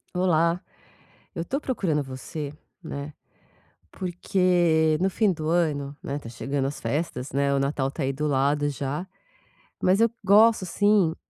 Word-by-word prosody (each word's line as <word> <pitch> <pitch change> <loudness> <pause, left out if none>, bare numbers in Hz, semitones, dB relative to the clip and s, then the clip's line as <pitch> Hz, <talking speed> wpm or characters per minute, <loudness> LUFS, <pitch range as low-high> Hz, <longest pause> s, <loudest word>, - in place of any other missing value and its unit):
Olá, 170 -1 +2 0.7
eu 165 0 -4
tô 275 - -1
procurando 175 - 0
você, 140 +3 -6 0.3
né. 145 -2 -6 0.8
Porque 175 -3 +2
no 190 +2 +2
fim 205 +1 +2
do 155 -3 -4
ano, 150 -4 0
né. 140 +1 -3
Tá 130 - -11
chegando 135 +4 -2
as 140 +2 -4
festas, 145 -4 -3
né. 140 0 +1
O - - +2
Natal 135 -1 0
tá 145 +2 -4
aí 135 - +1
do 150 +3 -2
lado 145 +1 +2
já, 145 +5 -4 0.8
mas 185 +1 +4
eu 230 0 +4
gosto, 210 +1 +5
assim 200 -2 +3
155 Hz, 150 wpm, -25 LUFS, 140-180 Hz, 0.8 s, gosto